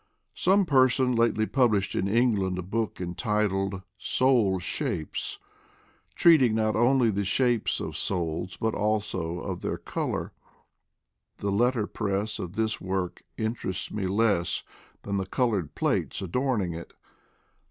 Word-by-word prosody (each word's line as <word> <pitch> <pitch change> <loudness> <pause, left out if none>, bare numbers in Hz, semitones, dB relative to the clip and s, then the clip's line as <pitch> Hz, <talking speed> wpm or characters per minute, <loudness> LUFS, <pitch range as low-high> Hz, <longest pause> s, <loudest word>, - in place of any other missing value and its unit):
Some 195 +2 +3
person 130 -3 +3
lately 115 -2 +2
published 110 -6 +2
in 95 - 0
England 105 -4 +2
a 90 - -3
book 110 +4 -2
entitled 95 0 -1
" - - -47 0.2
Soul 120 -8 +4
Shapes, 80 -3 -3 0.4
" - - -35
treating 135 -10 +5
not 110 -1 +1
only 120 +1 +4
of - - 0
the 100 - +1
shapes 120 +3 +1
of - - -5
souls 90 0 -2
but 110 0 0
also 100 -5 -1
of - - -5
their - - -2
color. - - -3 1.1
The 100 - -2
letter 120 +2 +2
press 105 0 -2
of 90 0 -5
this 110 0 -1
work 95 -1 -3 0.2
interests 110 -4 -3
me 100 -3 -2
less 100 -3 +1 0.4
than 100 0 -2
the 95 -1 -2
colored 105 - 0
plates - - 0
adorning 100 -1 -1
it. 85 +1 -8
105 Hz, 140 wpm, -27 LUFS, 95-120 Hz, 1.1 s, treating